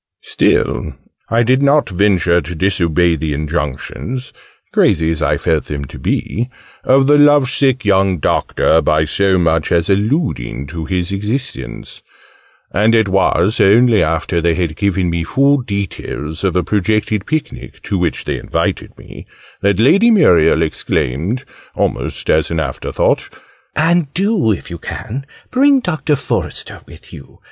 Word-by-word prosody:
Still 75 - 0 0.3
I 115 +1 +2
did 130 +3 +2
not 140 +1 +3
venture 90 -3 +2
to 85 +3 -7
disobey 85 -1 +1
the 75 -1 -3
injunctions 75 - -4 0.4
crazy 80 -4 +2
as 80 -1 -3
I 75 -1 +1
felt 80 0 0
them 70 -1 -5
to - - -11
be 120 +3 -2 0.3
of 135 +1 +4
the 145 +1 +4
lovesick 140 -3 +3
young 95 -2 +2
Doctor, 80 +1 +1
by 75 0 +2
so 95 +3 +1
much 80 -3 +1
as 85 +2 +2
alluding 100 - -1
to 80 +2 -6
his 90 +1 -2
existence: 105 - -5 0.7
and 110 +3 +2
it 110 -3 +2
was 95 +1 +1
only 115 +2 +5
after 80 +2 0
they 85 0 +1
had 85 -3 -2
given 95 -2 0
me 85 0 -2
full 140 +11 +2
details 95 - -5
of 95 -3 0
a 90 - +2
projected 105 +1 -1
picnic, 155 -1 -4
to 105 - -3
which 90 -3 -1
they - - -3
invited - - -3
me, - - -13 0.3
that 100 -1 +1
Lady 200 - +5
Muriel 85 - +4
exclaimed, 80 - -2 0.3
almost - - -2
as 80 -1 +2
an 85 - -2
after 70 -4 -4
thought, - - 0 0.5
"and 165 -2 +1
do, 195 - +1
if 95 -1 -4
you 85 - -6
can, 135 +5 -6 0.2
bring 275 +1 +4
Doctor 160 - -1
Forester - - -3
with - - -15
you! 70 - -13
95 Hz, 150 wpm, -16 LUFS, 80-125 Hz, 0.7 s, only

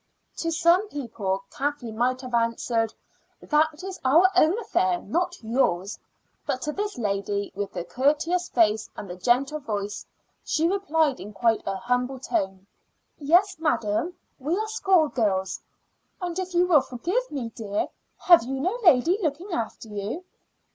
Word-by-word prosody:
To 330 - -1
some 340 +5 +3
people 205 - -3
Kathleen 275 -5 -3
might 255 +3 +1
have 255 -2 -8
answered, 230 -1 +1 0.5
"That 310 +2 +1
is 380 -1 -6
our 330 +9 +5
own 350 +2 +4
affair, 370 -5 +1
not 350 +2 -2
yours;" 215 -5 0 0.4
but 255 - -2
to 300 - -1
this 410 +5 -3
lady 200 -2 -2
with 200 0 -4
the 175 - -3
courteous 300 - +1
face 220 -2 +2
and 205 - -6
the 175 - -6
gentle 250 +10 +1
voice 205 -5 -4 0.4
she 325 +1 +1
replied 320 -7 +1
in 210 +2 -9
quite 225 +2 +2
a 195 - -1
humble 250 +5 -1
tone: 190 -6 -2 0.5
"Yes, 350 +7 +3
madam, 300 - 0 0.2
we 305 +7 -1
are 435 +1 -1
schoolgirls." 275 - +1 0.6
"And 355 -1 -3
if 370 -1 -4
you 350 +1 +5
will 325 -6 +5
forgive 350 - -2
me, 255 -6 -4
dear, 205 -2 -2 0.3
have 345 -8 +7
you 265 +3 -3
no 365 - 0
lady 340 +3 +5
looking 335 +4 -2
after 225 -2 -4
you?" 210 - -5
270 Hz, 150 wpm, -25 LUFS, 220-345 Hz, 0.6 s, have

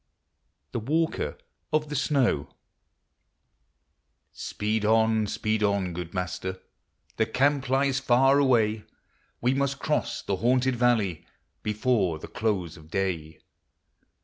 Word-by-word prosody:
THE - - -2
WALKER 160 +8 -1 0.3
OF 155 -1 +1
THE 150 - -4
SNOW. 130 - +1 1.8
Speed 105 +1 -2
on, 110 0 +3
speed 110 +1 -1
on, 100 -3 +1
good 85 0 -5
Master! 95 +1 -3 0.6
The 110 - +2
camp 135 +2 +1
lies 135 0 +2
far 135 +2 +4
away; 110 -6 +3 0.6
We 125 +2 +2
must 140 0 0
cross 150 +1 -1
the 100 - -1
haunted 125 +4 +2
valley 115 -9 +1 0.3
Before 105 -5 +1
the - - -9
close 95 -7 -2
of 80 0 -15
day. 85 -5 -2
110 Hz, 115 wpm, -27 LUFS, 95-135 Hz, 1.8 s, far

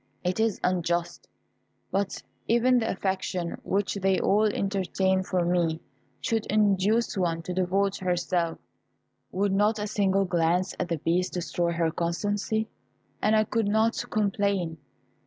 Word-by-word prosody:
It 180 +3 -1
is 225 -2 +1
unjust. 175 -1 -1 0.6
But 195 0 -1 0.2
even 245 +2 +4
if - - +4
the 225 - -1
affection 185 -2 -2
which 200 +1 0
they 195 -1 +1
all 210 +2 +3
entertain 190 -2 0
for 185 -2 -1
me 170 -2 +1 0.4
should 225 -1 -1
induce 210 +2 +2
one 170 -3 -1
to 180 - -4
devote 190 +2 +1
herself, 175 -2 -1 0.7
would 200 +1 0
not 210 +2 +3
a 210 - -2
single 195 -2 +1
glance 175 +1 +1
at 180 - -1
the 165 - 0
Beast 175 +4 0
destroy 175 -1 -1
her 165 -1 +1
constancy, 205 +6 -1 0.5
and 215 +1 +3
I 215 - +4
could 220 0 -1
not 220 +2 +2
complain. 200 -5 0
190 Hz, 140 wpm, -27 LUFS, 175-205 Hz, 0.7 s, even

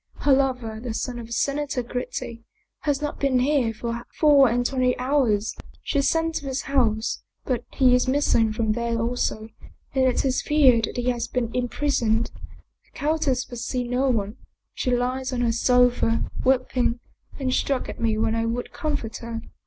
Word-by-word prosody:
Her 285 - +4
lover, 250 -5 0
the 230 -1 -5
son 245 +2 -3
of 230 0 -9
Senator 280 0 -1
Gritti, 240 -1 -5 0.4
has 290 -1 -1
not 295 - -3
been 275 -2 +2
here 255 -2 +2
for 235 +1 -4
four 285 -4 +6
and 245 +2 0
twenty 255 -1 +1
hours. 250 -6 +1 0.3
She 285 - +1
sent 325 +3 +1
to 285 - -6
his 265 0 -2
house, 230 -5 0 0.2
but 245 -2 -1
he 255 -2 +5
is 250 +1 +3
miss 285 +3 +2
ing 225 -1 +3
from 220 0 0
there 235 +1 -1
also 225 -2 -2 0.4
and 265 -1 +2
it 255 +1 +1
is 260 -1 +1
feared 260 -7 +4
that - - -8
he 245 +1 0
has 240 -1 -3
been 235 -1 -2
im 250 -1 0
prisoned. 235 -5 0 0.5
The - - -31
countess 295 -4 0
will 245 - -8
see 245 +2 -2
no 250 +2 0
one. 215 -1 -1 0.4
She - - -2
lies 250 +2 0
on 250 -1 -1
her 235 -1 +2
sofa, 245 -1 +2
weeping, 255 -2 +1 0.4
and 260 -2 -1
struck 270 -1 0
at - - -7
me 225 -2 +1
when 220 0 +1
I 230 0 0
would 240 +2 -3
comfort 285 -7 -3
her." 230 -1 -6
250 Hz, 185 wpm, -24 LUFS, 230-270 Hz, 0.5 s, four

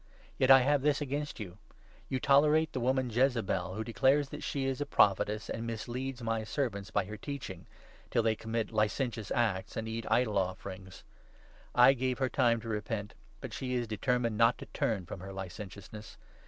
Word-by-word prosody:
Yet 130 - +4
20 135 -1 +8
I - - -2
have 145 0 +3
this 145 0 +2
against 145 0 -3
you 95 -2 -8 0.2
— - - -28
You 130 - -1
tolerate 150 +4 +4
the - - -2
woman 130 0 +1
Jezebel, 110 -8 +1
who 110 - -2
declares 135 +6 +2
that - - -7
she 135 -2 -2
is 135 +1 -2
a - - 0
Prophetess, 105 -2 +2
and 115 +1 -4
misleads 125 +3 -4
my 115 -1 -1
servants 110 -5 -2
by - - 0
her 105 +2 -7
teaching, 100 -8 -7 0.4
till 115 - +2
they 110 -1 +3
commit 110 0 -3
licentious 110 0 -1
acts 110 -6 0
and 110 0 -3
eat 115 0 -4
idol 110 -5 +2
offerings. 95 0 -5 0.7
I 125 +2 +8
gave 130 -1 -1
her 130 -1 0
time 120 -3 +2
to 115 - -9
repent, 105 -1 -3 0.3
but - - -7
she 125 -1 -3
is 125 - +1
21 - - -14
determined 115 0 0
not 115 +1 +5
to - - -8
turn 100 -5 0
from 90 - -7
her 95 +2 -8
licentiousness. 95 +2 -8
115 Hz, 195 wpm, -31 LUFS, 105-130 Hz, 0.7 s, 20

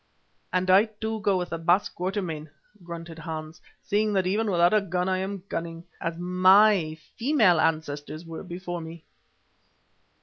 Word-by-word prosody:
"And 185 0 +1
I, 195 +4 +7
too, 220 0 -5
go 200 -3 +2
with 180 -1 -3
the 165 - -4
Baas 175 +4 +3
Quatermain," 180 -5 -4 0.3
grunted 170 -1 -8
Hans, 155 -1 -7 0.2
"seeing 210 +1 +1
that 190 -2 +1
even 210 +4 0
without 175 0 +3
a 215 - +4
gun 180 -1 -2
I 185 0 +1
am 195 0 -4
cunning, 165 -1 -5 0.2
as 165 0 -3
my 185 -1 +4 0.2
female 225 - +4
ancestors 155 0 -2
were 165 -1 -7
before 175 -1 -6
me." 165 0 -10
180 Hz, 155 wpm, -26 LUFS, 165-200 Hz, 0.3 s, I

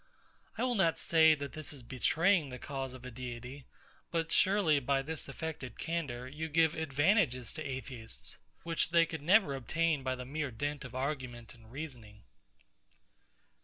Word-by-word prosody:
I - - 0
will 250 -1 +2
not 180 -7 +3
say 160 -1 +6
that 140 -1 -6
this 155 +2 -2
is 140 -5 -9
betraying 160 - +2
the 125 - -6
cause 135 -1 -5
of 130 -1 -11
a 125 - -6
Deity: 125 +2 -7 0.4
But 165 -1 -1
surely, 190 -7 +4
by 135 +1 +1
this 155 0 -4
affected 140 -4 -6
candour, 145 -8 -3
you 155 +4 -5
give 160 +1 +4
advantages 145 - +2
to - - -6
Atheists, 130 -4 -7 0.2
which 165 -1 0
they 170 0 +5 0.2
never 185 +3 +5
could - - -2
obtain 155 +3 +1
by 130 -1 -1
the 125 0 -7
mere 145 +2 -2
dint 145 +5 -3
of 125 -1 -9
argument 130 -4 -3
and 115 -1 -17
reasoning. 120 -8 -8
140 Hz, 165 wpm, -33 LUFS, 125-160 Hz, 0.4 s, say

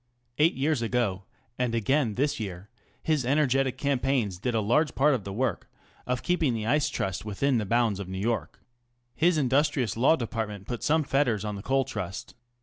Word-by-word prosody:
Eight 160 +3 +4
years 140 -1 0
ago, 115 -5 -1 0.3
and 125 -2 0
again 120 0 +1
this 145 +1 0
year, 100 -1 -6 0.3
his 155 -4 +1
energetic 135 -1 +1
campaigns 130 -8 0
did 120 +3 -1
a - - +3
large 120 +9 +1
part 150 +2 +4
of 120 -7 -2
the 100 - -5
work 125 +6 -2 0.4
of 125 -1 -1
keeping 165 -8 +1
the 110 -1 -3
Ice 145 +5 +2
Trust 95 -2 -3
within 115 +5 0
bounds 115 -3 +1
in 95 -2 -6
New 95 - -4
York. 105 -4 -2 0.5
His 170 +4 +2
industrious 135 -4 +1
Law 130 +8 +4
Department 110 -6 -4
put 120 +1 -5
some 155 +1 +2
fetters 125 -7 +1
on 105 -1 -3
the 100 - -6
Coal 135 +4 +1
Trust. 90 -3 -6
125 Hz, 180 wpm, -27 LUFS, 105-140 Hz, 0.5 s, Eight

